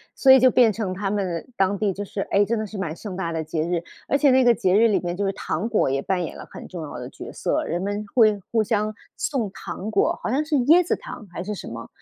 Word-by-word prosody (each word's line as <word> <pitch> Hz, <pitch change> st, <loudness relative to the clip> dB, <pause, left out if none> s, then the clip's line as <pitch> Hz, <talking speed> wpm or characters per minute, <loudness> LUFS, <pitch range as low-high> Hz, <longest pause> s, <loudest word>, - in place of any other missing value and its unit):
所 265 Hz, -, +5 dB
以 265 Hz, -, +9 dB
就 255 Hz, +1 st, +6 dB
变 235 Hz, -3 st, +4 dB
成 195 Hz, -3 st, -3 dB
他 195 Hz, +1 st, -2 dB
们 185 Hz, -5 st, -2 dB
当 195 Hz, +1 st, +1 dB
地 200 Hz, -2 st, 0 dB
就 205 Hz, -, -5 dB
是， 195 Hz, 0 st, -5 dB
哎， 200 Hz, +1 st, +4 dB
真 230 Hz, +3 st, -1 dB
的 215 Hz, -, -2 dB
是 210 Hz, 0 st, -8 dB
蛮 165 Hz, -5 st, -3 dB
盛 195 Hz, 0 st, -7 dB
大 170 Hz, -3 st, -3 dB
的 160 Hz, -1 st, -2 dB
节 155 Hz, 0 st, -3 dB
日。 170 Hz, 0 st, -1 dB, 0.2 s
而 280 Hz, -, +2 dB
且 285 Hz, -2 st, +4 dB
那 260 Hz, 0 st, +5 dB
个 240 Hz, -1 st, +6 dB
节 185 Hz, 0 st, +2 dB
日 230 Hz, +2 st, +6 dB
里 210 Hz, -, +2 dB
面 175 Hz, 0 st, -3 dB
就 200 Hz, -, -2 dB
是 195 Hz, -, +1 dB
糖 195 Hz, +3 st, -3 dB
果 220 Hz, -10 st, +2 dB
也 135 Hz, 0 st, 0 dB
扮 180 Hz, +3 st, -1 dB
演 -, -, -8 dB
了 -, -, -9 dB
很 -, -, -9 dB
重 175 Hz, -3 st, -7 dB
要 150 Hz, -, -7 dB
的 125 Hz, 0 st, -6 dB
角 -, -, -9 dB
色， -, -, -1 dB
人 175 Hz, +1 st, -2 dB
们 205 Hz, +2 st, -2 dB
会 215 Hz, -4 st, +5 dB
互 225 Hz, -2 st, +3 dB
相 215 Hz, -1 st, 0 dB, 0.2 s
送 240 Hz, -8 st, -2 dB
糖 205 Hz, +2 st, -6 dB
果， -, -, +1 dB
好 -, -, -1 dB
像 275 Hz, +6 st, +1 dB
是 305 Hz, -1 st, -1 dB
椰 345 Hz, +4 st, +6 dB
子 -, -, 0 dB
糖 -, -, -10 dB
还 175 Hz, -, -5 dB
是 210 Hz, +2 st, -4 dB
什 -, -, -8 dB
么， 115 Hz, 0 st, -7 dB
205 Hz, 305 characters per minute, -23 LUFS, 180-230 Hz, 0.2 s, 以